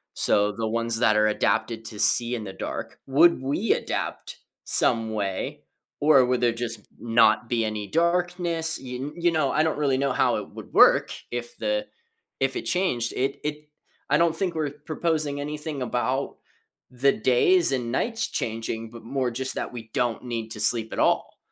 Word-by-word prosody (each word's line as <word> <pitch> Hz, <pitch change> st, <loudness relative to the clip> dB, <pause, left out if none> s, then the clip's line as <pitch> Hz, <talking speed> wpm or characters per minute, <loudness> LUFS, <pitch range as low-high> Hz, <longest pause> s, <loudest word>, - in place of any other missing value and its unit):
so, 105 Hz, 0 st, +3 dB
the 110 Hz, +2 st, -3 dB
ones 115 Hz, 0 st, 0 dB
that 110 Hz, -3 st, +4 dB
are 105 Hz, -, +4 dB
adapted 110 Hz, +2 st, 0 dB
to 105 Hz, -2 st, -8 dB
see 120 Hz, +1 st, +3 dB
in 115 Hz, -, -5 dB
the 95 Hz, -2 st, -7 dB
dark -, -, -6 dB
would 155 Hz, +3 st, +5 dB
we 145 Hz, +12 st, +1 dB
adapt -, -, -4 dB, 0.3 s
some 115 Hz, -1 st, +1 dB
way, 100 Hz, -3 st, -3 dB, 0.4 s
or 145 Hz, -3 st, +6 dB
would 125 Hz, 0 st, +1 dB
there 120 Hz, -1 st, +3 dB
just 115 Hz, -2 st, -4 dB, 0.2 s
not 115 Hz, 0 st, +3 dB
be 115 Hz, -2 st, +1 dB
any 105 Hz, -2 st, -4 dB
darkness? 170 Hz, -1 st, 0 dB
Y 125 Hz, -1 st, -6 dB, 0.2 s
you 175 Hz, 0 st, +2 dB
know, 155 Hz, -4 st, +1 dB
I 155 Hz, -, +2 dB
don't 160 Hz, -2 st, 0 dB
really 140 Hz, -3 st, +2 dB
know 140 Hz, 0 st, 0 dB
how -, -, +2 dB
it -, -, -6 dB
would -, -, -11 dB
work -, -, +6 dB, 0.2 s
if 120 Hz, 0 st, -5 dB
the 265 Hz, 0 st, -1 dB, 0.5 s
if -, -, 0 dB
it 360 Hz, -, -4 dB
changed. 130 Hz, -11 st, 0 dB
It 135 Hz, +2 st, -1 dB
it 150 Hz, 0 st, -5 dB, 0.4 s
I 145 Hz, -, +4 dB
don't 170 Hz, -1 st, +3 dB
think 185 Hz, -3 st, -1 dB
we're 155 Hz, -2 st, -1 dB, 0.2 s
proposing 155 Hz, -3 st, -1 dB
anything 150 Hz, 0 st, -5 dB
about 125 Hz, +2 st, -1 dB, 0.6 s
the 130 Hz, +2 st, +3 dB
days 165 Hz, +10 st, +3 dB
and 125 Hz, -3 st, -1 dB
nights 225 Hz, -, -1 dB
changing, 115 Hz, 0 st, -4 dB
but 115 Hz, -1 st, -11 dB
more 130 Hz, +1 st, -1 dB
just 130 Hz, +2 st, -3 dB
that -, -, -4 dB
we 115 Hz, -2 st, -8 dB
don't 120 Hz, 0 st, -1 dB
need 115 Hz, -2 st, -4 dB
to 110 Hz, -, -3 dB
sleep 110 Hz, +1 st, +1 dB
at -, -, -4 dB
all. -, -, +1 dB
125 Hz, 180 wpm, -25 LUFS, 115-155 Hz, 0.6 s, or